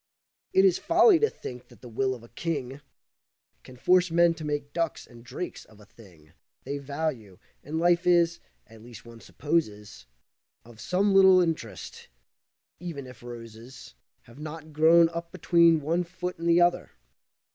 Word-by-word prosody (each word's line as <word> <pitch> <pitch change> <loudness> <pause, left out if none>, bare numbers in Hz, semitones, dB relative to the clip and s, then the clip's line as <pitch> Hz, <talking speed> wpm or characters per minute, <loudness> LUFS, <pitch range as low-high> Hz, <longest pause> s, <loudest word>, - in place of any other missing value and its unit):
It 190 - +4
is 185 -2 +3
folly 345 +2 +4
to 440 - +2
think 125 0 -10
that - - -20
the 125 - -11
will 130 +3 -2
of 120 - -14
a - - -14
king 145 -5 -5 0.8
Can 125 - -15
force 180 +6 +3
men 170 0 +3
to 160 - -10
make 145 -1 -4
ducks 165 -2 -3
and 120 -1 -16
drakes 175 +8 -7
of 110 -1 -21
a 105 - -16
thing 90 -9 -20 0.3
They 140 +2 -5
value, 140 - -5 0.3
and 155 +2 -5
life 175 +1 +2
is, 170 -1 +3 0.3
at 110 -1 -17
least 120 0 -13
one 115 -1 -13
supposes, 105 - -3 0.6
Of 115 -2 -15
some 195 - 0
little 190 -1 +6
interest, 160 - -4 0.7
even 165 -6 -7
if 125 -2 -14
roses 115 - -11 0.3
Have 120 +4 -17
not 155 0 -9
grown 165 +2 +5
up 170 0 -7
between 170 -2 +3
one 165 +5 -1
foot 180 0 -7
and 170 0 -2
the 170 +1 +4
other. 175 +1 +1
155 Hz, 165 wpm, -26 LUFS, 120-170 Hz, 0.8 s, little